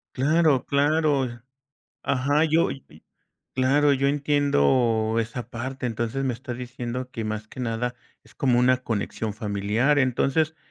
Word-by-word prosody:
Claro, 150 0 +3
claro. 145 -1 +2 0.8
Ajá. 140 +3 +2
Yo, 160 +1 +3 0.9
claro, 140 +3 +3
yo 140 0 +2
entiendo 130 - +2
esa 115 +1 -5
parte. 130 +2 -4
Entonces 120 +3 -2
me 130 - 0
estás 120 0 -7
diciendo 125 0 -5
que 115 - -4
más 110 0 -4
que 130 - -10
nada 120 0 -2 0.3
es - - -21
como 125 -3 +2
una 125 +1 +4
conexión 110 -1 -3
familiar. 110 +7 +1
Entonces, 140 +5 +1
130 Hz, 130 wpm, -25 LUFS, 115-140 Hz, 0.9 s, una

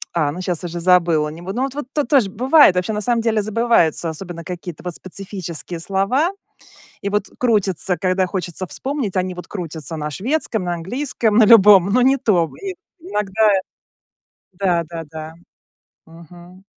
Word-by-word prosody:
А, 155 -4 +1
ну 175 +5 -6
щас 180 -2 -3
уже 175 0 -5
забыла, 170 -3 +3
не 160 +3 -10
бу 190 +2 -5
Ну 250 +4 -1
вот, 270 -1 -3
вот 290 -3 -5
тут 295 -4 -1
тоже 245 -7 +3
бывает, 255 - +5
вообще 180 +4 -1
на 210 - -2
самом 235 +1 +1
деле 225 -2 +1
забываются, 210 -7 +1
особенно 170 +1 -7
какие-то 175 -1 -7
вот 180 -1 -4
специфические 185 -3 -6
слова. 195 - +1 0.7
И 200 - -2
вот 205 -1 0
крутятся, 195 -6 +1
когда 185 0 +1
хочется 180 -1 -4
вспомнить, 260 - -4
они 185 0 -1
вот 180 - -9
крутятся 165 -4 -6
на 150 -1 -3
шведском, 225 - -2
на 175 -1 -1
английском, 220 - -1
на 230 - +7
любом, 205 -4 +7
но 250 - +4
не 265 +2 +4
то. 180 - +1
И 385 -2 -4 0.3
иногда 215 - +1 1.1
Да-да-да. 165 -4 -3 0.7
Мгм. 175 +3 -15
185 Hz, 160 wpm, -20 LUFS, 170-225 Hz, 1.1 s, на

